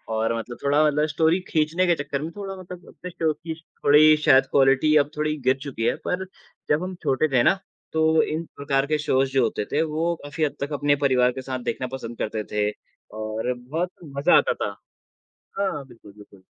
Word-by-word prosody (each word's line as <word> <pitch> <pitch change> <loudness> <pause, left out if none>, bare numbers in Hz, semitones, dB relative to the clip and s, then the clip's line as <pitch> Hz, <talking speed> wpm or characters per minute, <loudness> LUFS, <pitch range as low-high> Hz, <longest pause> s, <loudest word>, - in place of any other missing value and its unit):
और 115 +1 0
मतलब 120 +2 -6
थोड़ा 145 +2 +3
मतलब 150 +1 +2
स्टोरी 165 +3 +3
खींचने 160 +3 +1
के 170 - +4
चक्कर 140 0 -3
में 160 +2 -5
थोड़ा 195 -1 -5
मतलब 180 -1 -10
अपने 180 - -9
शो 160 -2 0
की 160 +2 -7 0.3
थोड़ी 155 +2 +7
शायद 130 0 +6
क्वालिटी 135 +3 +4
अब 145 - -17
थोड़ी 150 0 0
गिर 130 - +5
चुकी 115 -4 -4
है। - - +2
पर 190 +1 -1 0.4
जब 150 +4 +2
हम 185 0 -5
छोटे 135 +4 +2
थे 120 - +4
ना, 190 - +3 0.3
तो 160 0 +3
इन 160 +2 -3
प्रकार 140 -1 0
के 155 +1 0
शोज़ 135 -3 +1
जो 130 -2 +3
होते 105 -2 -1
थे, 150 - +2
वो 165 +2 -1
काफ़ी 150 +2 -3
हद 145 - -4
तक 145 +1 -3
अपने 145 0 +2
परिवार 125 -2 +4
के 130 - -6
साथ 130 -1 -4
देखना 130 +2 -5
पसंद 115 -2 -8
करते 110 0 -3
थे 105 0 +1 0.5
और 110 +3 -2
बहुत 160 +9 -3 0.3
मज़ा 140 - +5
आता - - +2
था। - - -3 0.9
हाँ, 150 -9 -1
बिल्कुल, 115 -4 -15
बिल्कुल। 100 -2 -17
145 Hz, 205 wpm, -24 LUFS, 130-160 Hz, 0.9 s, थोड़ी